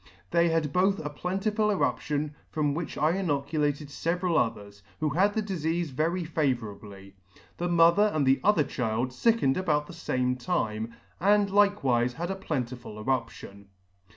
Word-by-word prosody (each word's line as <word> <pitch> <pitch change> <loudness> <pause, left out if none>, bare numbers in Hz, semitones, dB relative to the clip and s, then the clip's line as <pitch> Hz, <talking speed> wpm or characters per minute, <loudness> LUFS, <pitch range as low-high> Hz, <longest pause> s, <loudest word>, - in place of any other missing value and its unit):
They 170 0 +3
had 160 -3 0
both 195 +2 +3
a 150 - -3
plentiful 195 +7 -1
eruption, 150 -6 -1 0.2
from 150 -2 0
which 165 +2 -4
I 155 +1 +3
inoculated 150 -4 -1
feveral 170 +3 -1
others, 105 -6 -1 0.2
who 155 -1 +1
had 200 +6 +2
the 220 - 0
difeafe 170 -4 -2
very 165 +7 0
favourably. 110 - -3 0.4
The 175 +1 -2
mo 170 -1 +6
ther 205 +3 +4
and 155 -5 0
the 135 +1 +4
other 205 -7 +4
child 125 -1 -2
fickened 180 - +2
about 150 -5 +1
the 175 - -11
fame 125 -6 -1
time, 115 -8 -2 0.2
and 200 +2 +3
like 205 -1 +3
wife 120 -1 +2
had 170 +7 -4
a - - -2
plentiful 125 - -5
eruption. 110 -4 -4
155 Hz, 155 wpm, -27 LUFS, 125-180 Hz, 0.4 s, mo